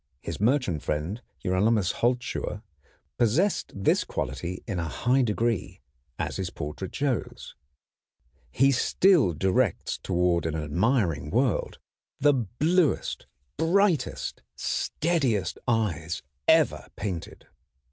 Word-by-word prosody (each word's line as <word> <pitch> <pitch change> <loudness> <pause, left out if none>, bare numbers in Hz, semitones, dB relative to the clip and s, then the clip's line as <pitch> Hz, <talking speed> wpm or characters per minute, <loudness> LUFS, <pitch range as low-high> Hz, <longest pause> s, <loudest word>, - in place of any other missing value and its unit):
His - - -5
merchant 110 - +1
friend 80 +10 -3 0.2
Hieronymus 100 +2 +2
Holzschuher 120 -3 -1 0.6
possessed 140 - +2
this 100 -1 +2
quality 90 +1 -4
in 100 -6 -3
a 85 - -2
high 125 - +1
degree, 105 -4 -1 0.4
as - - -3
his - - -2
portrait 75 +6 -6
shows. 140 -4 -2 1.0
He 135 - +3
still 160 - +4
directs 95 +5 0
toward 90 -2 +1
an 80 - -2
admiring 80 - 0
world 120 - 0 0.4
the 145 +1 +5
bluest, 145 - 0 0.3
brightest, 175 -4 +1
steadiest 130 - 0
eyes 85 -8 0 0.2
ever - - +4
painted. 90 -5 -5
110 Hz, 100 wpm, -27 LUFS, 90-130 Hz, 1.0 s, the